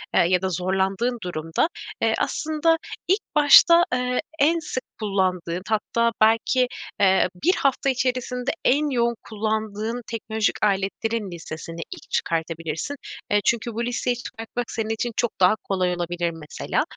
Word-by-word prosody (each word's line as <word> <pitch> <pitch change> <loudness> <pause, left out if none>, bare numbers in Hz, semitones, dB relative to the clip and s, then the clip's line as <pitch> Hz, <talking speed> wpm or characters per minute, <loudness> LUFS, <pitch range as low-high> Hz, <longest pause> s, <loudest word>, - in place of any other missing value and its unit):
eee, - - +6
ya 180 0 +2
da 190 - 0
zorlandığın 190 +7 0
durumda, 165 - -1 0.3
eee, - - +3
aslında 315 +1 +1 0.3
ilk 390 +5 +3
başta, 335 +3 +8
eee, 250 0 0 0.2
en 325 +4 +4
sık 300 -5 -4 0.2
kullandığın, 185 -4 -1
hatta 230 +2 +1
belki, 225 +3 +4 0.3
eee, 190 -2 +4
1 360 +4 +5
hafta 275 0 +1
içerisinde 255 0 -1
en 295 +3 +3
yoğun 235 -3 +1
kullandığın 220 +1 -2
teknolojik 220 -1 -1
aletlerin 200 +1 -1
listesini 165 -1 -7 0.2
ilk - - -10
çıkartabilirsin. 165 - -2 0.4
Eee, 205 0 +4
çünkü 235 -1 +1
bu 235 +2 -2
listeyi 245 0 -1
çıkartmak 235 0 -6
senin 220 -1 -3
için 225 +2 -1
çok 240 - -1
daha 185 +3 +5
kolay 185 -3 -1
olabilir 175 0 -2
mesela. 160 -2 -2
220 Hz, 140 wpm, -24 LUFS, 185-250 Hz, 0.4 s, başta